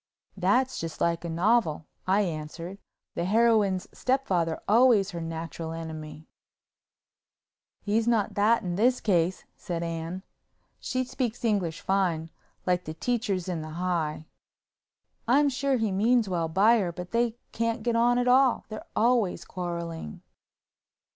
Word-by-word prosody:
"That's 205 +8 +1
just 165 -1 -5
like 170 0 0
a 170 - -4
novel," 170 -2 +1 0.2
I 195 +3 +4
answered, 170 +1 -5 0.3
"the 170 - -2
heroine's 210 -2 +3
stepfather's 185 -11 0
always 220 -3 +5
her 170 -2 -5
natural 165 0 -5
enemy." 155 -1 -7 1.6
"He's 220 +2 +1
not 225 -4 +2
that 215 +3 +3
in 175 -1 -3
this 245 +4 +3
case," 180 -3 +1
said 170 -1 -4
Anne—she 170 +9 -6
speaks 245 -2 -3
English 190 -7 0
fine, 175 -5 0 0.3
like 180 0 +1
the 155 - -6
teachers 210 -3 -1
in 175 -3 -2
the 155 - -7 1.6
High—"I'm 285 +4 +4
sure 275 0 0
he 220 -3 0
means 225 +4 +3
well 170 -3 -1
by 210 +8 +4
her, 180 -4 -1
but 180 +1 -8
they 235 0 +1
can't 230 0 -1
get 235 0 0
on 240 +1 +3
at 245 0 +1
all, 255 0 +4
they're 215 -1 -8
always 230 -4 +2
quarreling." 170 - -5
195 Hz, 135 wpm, -27 LUFS, 170-235 Hz, 1.6 s, always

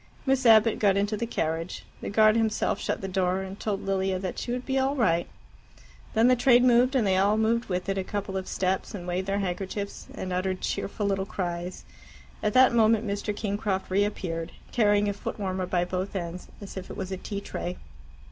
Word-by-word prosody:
Miss 265 -2 +2
Abbott 220 0 +6
got 200 -2 +3
into 205 +2 +1
the 230 +2 -3
carriage. 165 -4 -2 0.2
The - - -4
guard 215 +1 +5
himself 225 -2 +1
shut - - -2
the 195 - -3
door, 185 0 0
and 190 +1 -8
told 205 -3 -2
Lilia 190 -1 0
that 185 -1 -4
she 240 - -4
would 250 +1 -3
be 265 0 +1
all 270 +2 +1
right. 175 -10 +2 0.9
Then 225 +2 +5
the 255 - +6
train 245 0 +5
moved, 250 +2 +4
and 245 -5 +3
they 190 -1 +3
all 200 +3 +3
moved 230 +2 +2
with 180 0 -2
it 195 0 0
a - - -1
couple 200 0 -4
of 190 -1 -3
steps, 190 +2 -1
and 175 -3 -7
waved 180 +2 -2
their 200 0 0
handkerchiefs, 195 +1 -4
and 185 -1 -4
uttered 185 +1 -1
cheerful 205 +1 -2
little 195 -1 0
cries. 175 -1 -4 0.6
At 210 - 0
that 255 -1 +6
moment 225 -1 +4
Mr. 205 +1 -2
Kingcroft 205 -2 -2
reappeared, 185 -4 -1 0.2
carrying 205 -3 +3
a 205 - 0
footwarmer 190 -2 -3
by 175 -1 +1
both 185 +2 -3
ends, 175 -1 -4
as 200 -1 -9
if 185 - -6
it - - -7
was 190 0 -4
a 190 - -2
tea 200 +2 -5
tray. 180 -2 -5
200 Hz, 205 wpm, -27 LUFS, 185-220 Hz, 0.9 s, Abbott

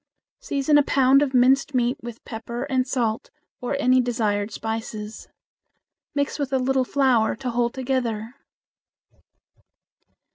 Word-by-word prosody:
Season 290 +1 +2
a - - +4
pound 275 0 +4
of 275 -2 0
minced 265 +2 +3
meat 245 0 +2
with 235 -1 -9
pepper 235 +1 -5
and 260 -2 0
salt 235 -4 -1 0.3
or 250 +3 -2
any 255 -2 +4
desired 215 -4 -1
spices. 220 -1 -5 0.9
Mix 285 +1 -1
with 280 -2 -2
a 265 - +2
little 260 0 +1
flour 255 -5 +2
to 255 -2 -4
hold 235 +1 0
together. 245 -4 -2
250 Hz, 130 wpm, -23 LUFS, 230-270 Hz, 0.9 s, a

